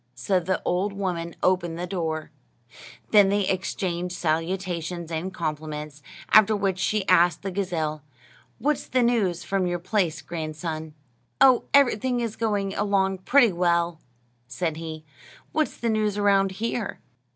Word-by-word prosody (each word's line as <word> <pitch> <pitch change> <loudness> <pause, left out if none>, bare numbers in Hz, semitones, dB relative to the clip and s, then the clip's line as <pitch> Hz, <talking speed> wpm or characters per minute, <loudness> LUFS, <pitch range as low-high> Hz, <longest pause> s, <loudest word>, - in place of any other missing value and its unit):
So 180 - +1
the 185 +2 -2
old 190 +3 0
woman 175 -4 -3
opened 175 -3 +1
the 175 - -3
door. 160 -4 -3 0.8
Then 205 -3 +6
they 200 -1 +1
exchanged 180 -1 -2
salutations 170 0 -2
and 165 +4 -3
compliments, 150 -3 -5 0.3
after 215 0 +6
which 195 -2 -1
she 200 +1 0
asked 175 -2 +4
the 195 - -3
gazelle, 165 -5 -2 0.6
"What's 295 +3 -1
the 255 -1 +2
news 200 -8 +1
from 190 0 0
your 175 0 -1
place, 180 -2 -1
grandson?" 155 -1 -5 0.4
"Oh, 255 -2 +6
everything 255 -3 +3
is 230 -3 -3
going 205 -3 -1
along 195 -2 +1
pretty 245 +3 +4
well," 170 -1 +1 0.5
said 160 0 -3
he; 160 -1 -7 0.5
"what's 310 -1 -1
the 235 - -2
news 215 -2 +1
around 195 -2 +3
here?" 225 +1 -3
185 Hz, 140 wpm, -25 LUFS, 165-205 Hz, 0.8 s, Then